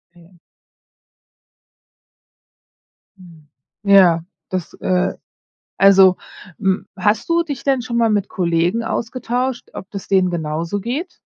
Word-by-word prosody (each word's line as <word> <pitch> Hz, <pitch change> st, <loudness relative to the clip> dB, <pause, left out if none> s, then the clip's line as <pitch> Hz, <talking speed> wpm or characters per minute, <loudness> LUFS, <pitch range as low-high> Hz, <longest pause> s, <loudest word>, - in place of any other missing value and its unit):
Mhm. 175 Hz, +1 st, -20 dB, 2.8 s
Mm. 165 Hz, -5 st, -17 dB, 0.4 s
Ja, 185 Hz, -5 st, +5 dB, 0.3 s
das 185 Hz, -3 st, -4 dB
äh, 180 Hz, -1 st, 0 dB, 0.7 s
also, 195 Hz, -2 st, +6 dB, 0.4 s
mm, 190 Hz, -2 st, 0 dB
hast 205 Hz, -, 0 dB
du 335 Hz, 0 st, +3 dB
dich 285 Hz, -7 st, -6 dB
denn 270 Hz, -3 st, +1 dB
schon 235 Hz, 0 st, -4 dB
mal 230 Hz, -1 st, +3 dB
mit 205 Hz, -2 st, 0 dB
Kollegen 175 Hz, +4 st, 0 dB
ausgetauscht, 245 Hz, +2 st, -3 dB
ob 190 Hz, -, -9 dB
das 200 Hz, -2 st, -8 dB
denen 185 Hz, -2 st, +3 dB
genauso 165 Hz, +3 st, -3 dB
geht? 275 Hz, -, -4 dB
195 Hz, 110 wpm, -19 LUFS, 180-235 Hz, 2.8 s, also